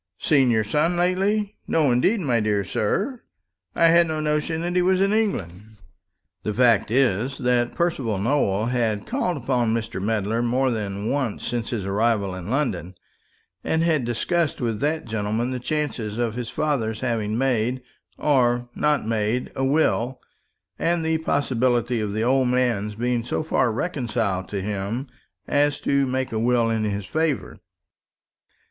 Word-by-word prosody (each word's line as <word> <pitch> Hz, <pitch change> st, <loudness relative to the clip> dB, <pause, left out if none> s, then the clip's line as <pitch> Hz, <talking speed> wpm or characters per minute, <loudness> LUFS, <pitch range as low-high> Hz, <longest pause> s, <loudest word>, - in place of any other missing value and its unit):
"Seen 135 Hz, -5 st, +3 dB
your 110 Hz, -2 st, +3 dB
son 155 Hz, +10 st, +1 dB
lately? 195 Hz, +4 st, +1 dB
No; 150 Hz, -5 st, +2 dB
indeed, 185 Hz, -, +2 dB
my 125 Hz, -7 st, +1 dB
dear 105 Hz, -2 st, +1 dB
sir, 210 Hz, -, -1 dB, 0.5 s
I 170 Hz, -, +4 dB
had 170 Hz, 0 st, +5 dB
no 155 Hz, -1 st, -2 dB
notion 155 Hz, +1 st, -1 dB
that 175 Hz, +1 st, -2 dB
he 180 Hz, -, +4 dB
was 185 Hz, +1 st, +3 dB
in 195 Hz, +2 st, +2 dB
England." 110 Hz, -, -2 dB, 0.6 s
The 105 Hz, -, -3 dB
fact 115 Hz, -5 st, +4 dB
is, 125 Hz, +1 st, +1 dB
that 125 Hz, -1 st, +1 dB
Percival 135 Hz, -, 0 dB
Nowell 105 Hz, -2 st, +1 dB
had 115 Hz, -4 st, 0 dB
called 200 Hz, -, -1 dB
upon 120 Hz, -3 st, 0 dB
Mr. 110 Hz, -4 st, -3 dB
Medler 110 Hz, +2 st, 0 dB
more 125 Hz, +2 st, +1 dB
than 100 Hz, -3 st, -3 dB
once 130 Hz, -5 st, -2 dB
since 120 Hz, -1 st, -2 dB
his 110 Hz, -6 st, -3 dB
arrival 100 Hz, -1 st, +1 dB
in 90 Hz, +1 st, -7 dB
London; 95 Hz, -, -1 dB, 0.7 s
and 160 Hz, +1 st, +1 dB
had 160 Hz, -5 st, +2 dB
discussed 150 Hz, +7 st, -1 dB
with 115 Hz, -4 st, -1 dB
that 155 Hz, +4 st, -1 dB
gentleman 110 Hz, +2 st, -2 dB
the 130 Hz, -, -3 dB
chances 125 Hz, -6 st, -3 dB
of 120 Hz, -2 st, 0 dB
his 120 Hz, -1 st, -4 dB
father's 115 Hz, -8 st, -1 dB
having 110 Hz, -4 st, -1 dB
made, 125 Hz, -1 st, 0 dB, 0.3 s
or 120 Hz, -4 st, +2 dB
not 150 Hz, -4 st, +1 dB
made, 110 Hz, +2 st, -1 dB
a 135 Hz, -, -1 dB
will, 130 Hz, -3 st, +1 dB, 0.6 s
and 170 Hz, -1 st, +1 dB
the 160 Hz, 0 st, +1 dB
possibility 125 Hz, -5 st, +1 dB
of 105 Hz, -2 st, -2 dB
the 110 Hz, +1 st, -1 dB
old 130 Hz, +1 st, +3 dB
man's 120 Hz, -5 st, 0 dB
being 120 Hz, +1 st, -1 dB
so 125 Hz, -, -2 dB
far 130 Hz, -6 st, +1 dB
reconciled 115 Hz, -, -2 dB
to 100 Hz, -2 st, -3 dB
him 105 Hz, +5 st, -3 dB, 0.4 s
as 145 Hz, 0 st, +2 dB
to 140 Hz, -1 st, +2 dB
make 130 Hz, 0 st, -2 dB
a 110 Hz, -, -1 dB
will 120 Hz, 0 st, +2 dB
in 110 Hz, -1 st, 0 dB
his 100 Hz, -1 st, -2 dB
favour. 155 Hz, -, -2 dB
120 Hz, 160 wpm, -23 LUFS, 110-150 Hz, 0.7 s, had